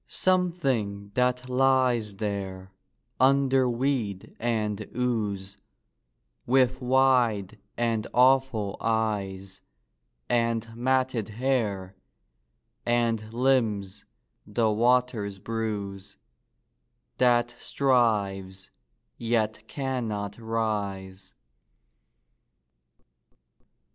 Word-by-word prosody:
Something 135 - 0
that 125 +1 +1
lies 125 -4 +2
there 95 -2 -4 0.5
under 135 0 +4
weed 120 -6 -2
and 110 -3 -1 0.2
ooze, 105 -6 -2 0.9
With 130 +1 +3
wide 125 -6 +2 0.2
and 115 -2 0
awful 125 -5 +3
eyes 100 -4 -2 0.7
And 115 -1 0
matted 130 -2 0
hair, 105 -6 -1 0.9
and 115 -2 0
limbs 115 -6 0 0.4
the 110 +1 +1
waters 115 -3 +1
bruise, 100 -2 -4 1.0
That 120 -1 +3
strives 100 -8 0 0.5
yet 115 -2 0
can 130 -4 -3
not 100 -1 -4
rise. 100 -4 -3
115 Hz, 70 wpm, -27 LUFS, 100-125 Hz, 1.0 s, under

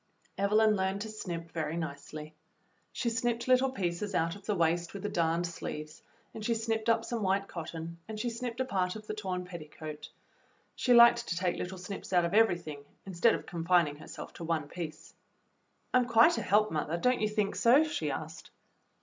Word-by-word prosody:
Evelyn 215 +2 +3
learned 190 +1 -1
to 220 - -4
snip 170 -6 -6
very 160 0 -2
nicely. 155 0 -6 0.6
She 235 - -1
snipped 235 0 -1
little 255 +1 +4
pieces 195 -4 -3
out 165 +2 +1
of 200 0 -14
the 210 - +1
waist 170 +1 +1
with 200 - -6
the 210 - -1
darned 170 -2 +1
sleeves, 155 -2 -6 0.3
and 220 - -7
she 230 +1 +1
snipped 225 0 -1
up 230 0 +3
some 235 -2 -3
white 195 0 +1
cotton, 165 0 -6
and 215 -1 -6
she 240 +2 -1
snipped 235 0 -5
a 260 - +1
part 185 -6 -1
of 215 -1 -8
the 215 - -4
torn 185 -4 -3
petticoat. 155 -3 -8 0.7
She 250 - 0
liked 235 0 +7
to - - -1
take 180 0 0
little 185 +1 -4
snips 185 +2 -7
out 175 -1 +4
of 170 - -2
everything, 175 -9 +2 0.2
instead 190 +4 +3
of - - -7
confin 170 -1 +2
ing 145 - -8
herself - - -9
to - - -8
one 160 -3 -1
piece. 155 -1 -7 0.8
"I'm 250 -1 +4
quite 235 +9 +5
a - - -3
help, 210 +2 +3
mother, 155 +1 -1
don't 250 +7 +2
you 215 - +2
think 210 -2 0
so.^" 255 +6 +6
she 315 - -2
asked. - - -6
190 Hz, 195 wpm, -31 LUFS, 170-225 Hz, 0.8 s, liked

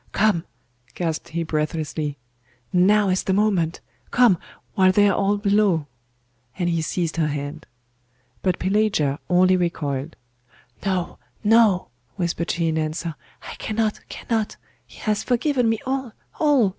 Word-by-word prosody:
'Come!' 195 -5 +2 0.5
gasped 165 -3 -2
he 170 +1 -2
breathlessly. 155 -2 -2 0.6
'Now 200 +3 +4
is 185 0 +2
the 190 - 0
moment! 190 -5 +1 0.3
Come, 235 -8 +4 0.3
while 185 -1 +5
they 205 +2 +5
are 200 - +3
all 200 +1 +2
below!' 200 -6 +2 0.7
and 175 - 0
he 170 -1 +1
seized 165 +1 -2
her 160 -2 +2
hand. 145 +1 -5 0.7
But 185 - +1
Pelagia 185 -8 +1
only 185 +1 +5
recoiled. 155 -4 -2 0.7
'No, 185 -3 -2 0.2
no,' 215 -4 +4 0.3
whispered 170 -2 -2
she 170 -1 0
in 160 0 0
answer, 155 +2 -2 0.3
'I - - -7
cannot, 220 -1 -1
cannot 225 -2 -2 0.3
he - - -16
has 215 -1 0
forgiven 250 -1 +1
me 225 - +1
all, 265 -3 -2 0.3
all! 285 -9 +4
185 Hz, 135 wpm, -23 LUFS, 165-210 Hz, 0.7 s, while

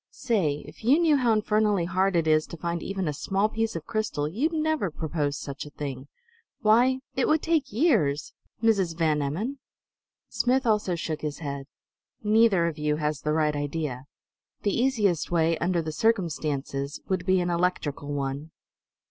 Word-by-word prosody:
Say, 185 - -1
if - - -13
you 260 +7 +5
knew 330 -3 +4
how 250 -4 +2
infernally 210 -3 +2
hard 190 +1 +1
it 165 -2 +2
is 155 -1 +3
to 170 - -8
find 170 +1 -3
even 190 -3 -3
a 150 - -1
small 195 +8 0
piece 225 -1 -2
of 160 -2 -5
crystal, 215 -10 -1
you'd 245 - 0
never 315 - 0
propose 150 -2 -2
such 140 -1 -6
a 150 - -9
thing! 140 -2 -6 0.5
Why, 245 +4 +4
it 260 - +1
would 310 0 +2
take 320 -4 +1
years 205 - +1 0.3
Mrs. 195 -7 +2
Van 155 -3 +2
Emmon!" 205 - -3 0.7
Smith 260 +1 +1
also 210 -5 +2
shook 160 -2 -4
his 150 -1 -3
head. 140 -3 -5 0.6
"Neither 210 -4 +4
of 165 -2 -3
you 150 0 +1
has 150 -1 -2
the 150 - 0
right 155 -1 +1
idea. 145 -3 -3 0.6
The 205 - +1
easiest 220 - +1
way, 165 -1 +2
under 170 0 0
the 155 - -3
circumstances, 155 - -1
would 185 -1 -1
be 185 0 +3
an 175 0 0
electrical 170 -5 -1
one." 140 +2 -3
175 Hz, 170 wpm, -26 LUFS, 150-220 Hz, 0.7 s, you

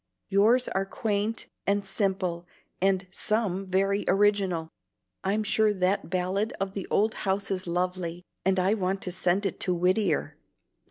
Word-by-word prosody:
Yours 220 +6 +4
are 195 - 0
quaint 210 +2 -2 0.2
and 200 0 +1
simple 190 -3 -1 0.3
and 190 0 +2
some 195 -3 -1
very 195 +2 +1
original. 195 -5 +2 0.6
I'm 205 +3 +1
sure 215 0 +3
that 185 0 0
ballad 185 +4 0
of 195 0 -2
the 195 -2 -5
old 220 +2 +2
house 195 0 -1
is 185 -1 -2
lovely, 180 0 -2 0.2
and 190 0 +2
I 190 +3 +3
want 195 -2 -1
to 180 - -3
send 180 +2 +1
it 195 - -2
to 180 - +1
Whittier. 180 -1 +1
195 Hz, 150 wpm, -27 LUFS, 185-205 Hz, 0.6 s, Yours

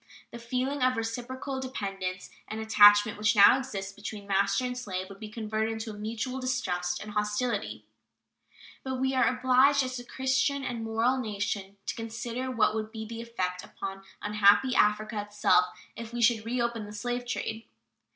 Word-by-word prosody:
The 235 - -8
feeling 255 +4 -2
of 255 -1 +3
reciprocal 245 +4 -4
dependence 195 -7 -4 0.2
and 215 - -5
attachment 205 -1 +6
which 210 +2 +3
now 200 +4 +8
exists 195 -7 -5
between 205 0 -7
master 200 +4 +1
and 250 0 -3
slave 190 -6 -4
would 195 0 -11
be 215 - -7
converted 220 0 -2
into 220 0 -5
mutual 225 +5 -4
distrust 180 -9 -1
and 215 - -8
hostility. 210 +1 -2 1.0
But 265 0 -3
we 265 0 +1
are 255 -3 +3
obliged 260 +2 +4
as 255 -1 -4
a - - -8
Christian 265 +2 0
and 235 -2 -3
moral 225 +4 +1
nation 205 -3 -3
to - - -2
consider 230 +3 -4
what 225 -4 +2
would 215 0 -3
be 220 -1 -6
the 230 +1 -6
effect 185 -6 -3
upon 195 0 -7 0.2
unhappy 210 +4 +4
Africa 210 -1 +2
itself 205 -3 +3 0.3
if 230 0 -7
we 240 - -2
should 225 -1 +3
reopen 235 -2 -1
the 205 - -10
slave 245 +3 -3
trade. 225 -2 -4
225 Hz, 165 wpm, -28 LUFS, 205-250 Hz, 1.0 s, now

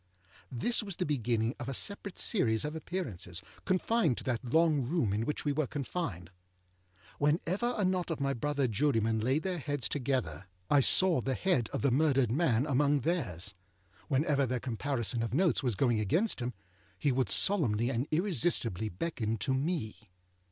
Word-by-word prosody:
This 135 - +1
was 200 -4 -5
the 180 - -2
beginning 120 -4 0
of 130 -1 -5
a 135 - -3
separate 200 +3 -3
series 115 - +1
of 150 +1 -4
appearances, 105 - -4 0.2
confined 185 - +1
to - - -6
that 125 -2 -2
long 155 +3 +2
room 125 - 0
in 110 +3 -1
which 150 - -3
we 145 - +2
were 145 -1 0
confined. 130 - -4 0.9
Whenever 180 +11 0
a 205 - +1
knot 185 -1 0
of 165 - -3
my 140 0 0
brother 140 +1 -1
jurymen 115 -2 +1
laid 130 +8 0
their 185 -2 -2
heads 145 -5 -2
together, 125 - -2 0.2
I 145 - +6
saw 170 +2 +6
the 135 +2 -1
head 175 - +1
of - - -3
the 140 - +3
murdered 135 -3 +2
man 130 -3 +2
among 145 0 +2
theirs. 105 - -2 0.5
Whenever 140 -1 +1
their 125 +1 -1
comparison 120 -1 -2
of 115 +2 -2
notes 175 +1 +2
was 125 -6 0
going 120 0 +2
against 165 - +1
him, 120 -1 -4 0.4
he 140 - +1
would 130 0 0
solemnly 125 - +2
and 125 +3 -2
irresistibly 155 - +1
beckon 110 - -3
to 130 +4 -1
me. 130 - -3
135 Hz, 170 wpm, -31 LUFS, 115-160 Hz, 0.9 s, I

